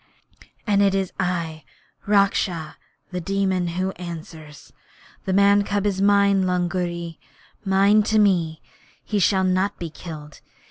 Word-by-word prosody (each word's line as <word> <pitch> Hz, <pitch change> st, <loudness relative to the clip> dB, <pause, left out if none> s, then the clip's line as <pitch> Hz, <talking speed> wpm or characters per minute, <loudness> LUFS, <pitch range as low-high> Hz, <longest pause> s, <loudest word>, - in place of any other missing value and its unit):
'And 205 Hz, -2 st, +2 dB
it 195 Hz, -1 st, +3 dB
is 190 Hz, -2 st, -2 dB
I, 165 Hz, -3 st, -2 dB, 0.4 s
Raksha 195 Hz, -5 st, +1 dB, 0.4 s
[The 180 Hz, 0 st, -4 dB
Demon], 190 Hz, -1 st, 0 dB
who 185 Hz, +1 st, -1 dB
answer. 165 Hz, -3 st, -8 dB, 0.8 s
The 190 Hz, -, -1 dB
man's 200 Hz, +1 st, +4 dB
cub 205 Hz, -1 st, -1 dB
is 195 Hz, -2 st, 0 dB
mine, 200 Hz, -1 st, +3 dB
Lungri 175 Hz, -2 st, -2 dB, 0.4 s
mine 200 Hz, +2 st, +4 dB
to 220 Hz, 0 st, +1 dB
me! 175 Hz, -6 st, +2 dB, 0.4 s
He 210 Hz, -, -1 dB
shall 190 Hz, 0 st, +3 dB
not 185 Hz, +2 st, 0 dB
be 170 Hz, -2 st, -6 dB
killed. 150 Hz, -3 st, -10 dB
185 Hz, 130 wpm, -22 LUFS, 170-200 Hz, 0.8 s, man's